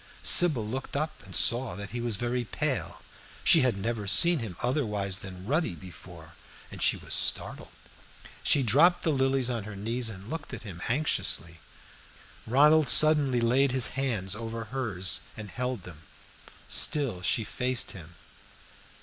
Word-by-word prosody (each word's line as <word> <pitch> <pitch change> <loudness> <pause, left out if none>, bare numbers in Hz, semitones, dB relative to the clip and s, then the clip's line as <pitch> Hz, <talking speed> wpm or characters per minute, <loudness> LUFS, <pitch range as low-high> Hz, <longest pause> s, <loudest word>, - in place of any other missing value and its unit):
Sybil 150 -11 +5
looked 130 +5 -6
up 155 +1 -4
and - - -9
saw 120 +1 +1
that 100 0 -8
he 120 - -5
was 120 -3 -2
very 120 +3 -3
pale. 110 - -4 0.4
She 165 - +6
had 125 -6 +1
never 105 0 -4
seen 170 - +6
him 110 -8 -7
otherwise 105 -8 -1
than 95 -1 -10
ruddy 150 - -1
before, 85 -1 -13 0.4
and - - -10
she - - +2
was - - -5
startled; - - +1 0.7
she 140 - +2
dropped 155 - +3
the 160 - +1
lilies 135 -2 0
on 115 -4 -4
her 105 -1 -8
knees 115 +4 -2
and 100 -1 -10
looked 165 +6 -7
at - - -12
him 90 -6 -10
anxiously. 85 - -2 0.9
Ronald 150 +5 +4
suddenly 145 -5 +5
laid 130 +3 +2
his 130 -2 +2
hands 115 -8 -3
over 115 +1 -6
hers 105 -9 -1 0.2
and 105 -3 -9
held 125 -3 -4
them. 85 -4 -12 0.7
Still 135 -12 +1
she 110 +5 +2
faced 125 +3 -2
him. 85 -2 -12
120 Hz, 155 wpm, -27 LUFS, 100-135 Hz, 0.9 s, She